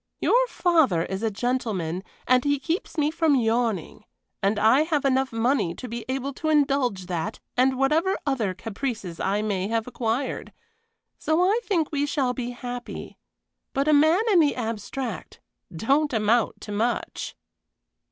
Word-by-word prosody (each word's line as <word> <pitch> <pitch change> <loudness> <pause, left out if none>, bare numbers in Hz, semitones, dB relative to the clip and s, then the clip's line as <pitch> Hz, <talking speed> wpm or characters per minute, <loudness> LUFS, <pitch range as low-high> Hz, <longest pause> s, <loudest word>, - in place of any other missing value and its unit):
Your - - +3
father 320 - +2
is 190 +1 -4
a 225 - +1
gentleman 205 -6 -2 0.2
and 250 0 +4
he 285 0 +2
keeps 330 +5 -3
me 300 0 +2
from 320 -2 +2
yawning, 225 - 0 0.4
and 200 +2 +1
I 220 +7 +5
have 310 -3 0
enough 265 0 +2
money 225 -6 +1
to 250 - -7
be 235 -1 -6
able 270 +1 -2
to 315 - 0
indulge 275 -10 +2
that 180 +4 -3 0.2
and 260 +1 +3
whatever 315 +8 +2
other 230 -10 0
caprices 215 -4 -5
I 200 +2 0
may 195 -3 -1
have 225 0 -1
acquired; 250 +1 -3 0.7
so 315 +3 +2
I 405 +5 +3
think 335 -7 0
we 290 -1 0
shall 270 -4 0
be 245 -1 -4
happy. 245 0 -7 0.5
But 275 +2 0
a 305 - +5
man 315 +6 +5
in 370 - +6
the 295 -3 +3
abstract 230 0 -5 0.4
don't 280 - +2
amount 225 +1 +1
to 210 - -7
much!" 225 +4 -2
250 Hz, 155 wpm, -25 LUFS, 220-290 Hz, 0.7 s, in